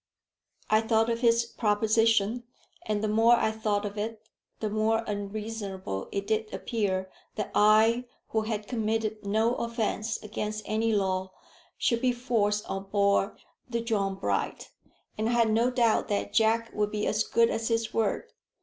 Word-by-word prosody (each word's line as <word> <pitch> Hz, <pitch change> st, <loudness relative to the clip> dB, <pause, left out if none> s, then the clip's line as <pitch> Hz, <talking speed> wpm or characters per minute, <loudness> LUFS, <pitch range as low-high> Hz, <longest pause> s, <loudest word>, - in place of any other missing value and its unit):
I 215 Hz, 0 st, +5 dB
thought 225 Hz, 0 st, +2 dB
of 230 Hz, -, -1 dB
his 235 Hz, -1 st, +3 dB
proposition; 225 Hz, +1 st, +2 dB, 0.4 s
and 210 Hz, 0 st, -1 dB
the -, -, +1 dB
more 225 Hz, +3 st, +5 dB
I 220 Hz, -, +1 dB
thought 210 Hz, -2 st, -1 dB
of 205 Hz, 0 st, -5 dB
it, 220 Hz, +1 st, -5 dB, 0.3 s
the 215 Hz, -, -1 dB
more 220 Hz, +1 st, +1 dB
unreasonable 205 Hz, -, -4 dB
it 200 Hz, 0 st, -2 dB
did 220 Hz, 0 st, -1 dB
appear 190 Hz, -5 st, -2 dB, 0.2 s
that 210 Hz, -, -3 dB
I, 220 Hz, +3 st, +4 dB, 0.2 s
who 220 Hz, -, +1 dB
had 215 Hz, -1 st, -3 dB
committed 220 Hz, -2 st, -1 dB
no 220 Hz, +3 st, +2 dB
offence 230 Hz, -1 st, -2 dB
against 215 Hz, 0 st, -4 dB
any 225 Hz, +1 st, 0 dB
law, 190 Hz, -2 st, 0 dB, 0.4 s
should 235 Hz, -2 st, +1 dB
be 255 Hz, -1 st, +2 dB
forced 225 Hz, -4 st, 0 dB
on 195 Hz, 0 st, -4 dB
board 200 Hz, 0 st, +1 dB, 0.3 s
the 235 Hz, -1 st, -1 dB
John 205 Hz, -4 st, -1 dB
Bright. 100 Hz, -, -2 dB, 0.5 s
And 220 Hz, +1 st, +1 dB
I -, -, +1 dB
had 230 Hz, -2 st, +3 dB
no 230 Hz, +3 st, +3 dB
doubt 240 Hz, -3 st, +2 dB
that 205 Hz, -, -2 dB
Jack 230 Hz, +1 st, +2 dB
would 210 Hz, 0 st, 0 dB
be 210 Hz, 0 st, -2 dB
as 215 Hz, 0 st, +1 dB
good 230 Hz, 0 st, +3 dB
as 225 Hz, 0 st, -2 dB
his 230 Hz, -1 st, 0 dB
word. 220 Hz, -3 st, -1 dB
220 Hz, 160 wpm, -28 LUFS, 210-230 Hz, 0.5 s, I